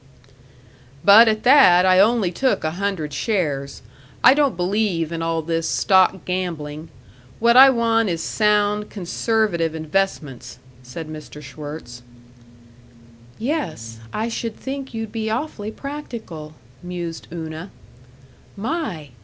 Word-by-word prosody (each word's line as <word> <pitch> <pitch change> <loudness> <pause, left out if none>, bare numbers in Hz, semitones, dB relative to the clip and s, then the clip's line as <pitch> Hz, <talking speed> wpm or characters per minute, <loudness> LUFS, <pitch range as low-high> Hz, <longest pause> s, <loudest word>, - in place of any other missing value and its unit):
"But 215 +4 +8
at 215 -1 0
that, 245 -10 +6
I 185 0 +5
only 210 -2 +3
took 260 +9 0
a 155 - -1
hundred 175 -5 -3
shares. 145 - -2 0.4
I 260 - +8
don't 280 - +1
believe 180 -3 0
in 165 -1 -4
all 165 -1 -1
this 165 0 -2
stock 190 -1 +3
gambling. 165 -4 -4 0.5
What 235 +1 +3
I 265 +2 +10
want 230 -3 +2
is 165 -2 -2
sound, 210 0 +1
conservative 185 -3 -1
investments," 155 -7 -3 0.2
said 130 +6 -8
Mr. 155 -1 -9
Schwirtz. 145 -3 -9 1.4
"Yes, 160 - -4
I 220 +2 -2
should 230 -1 -4
think 270 0 -6
you'd 225 -1 -5
be 220 -1 -3
awfully 225 -3 -3
practical," 220 - -8 0.3
mused 175 -2 -6
Una. 160 +2 -7 0.9
"My! 200 - -4
185 Hz, 120 wpm, -21 LUFS, 160-225 Hz, 1.4 s, I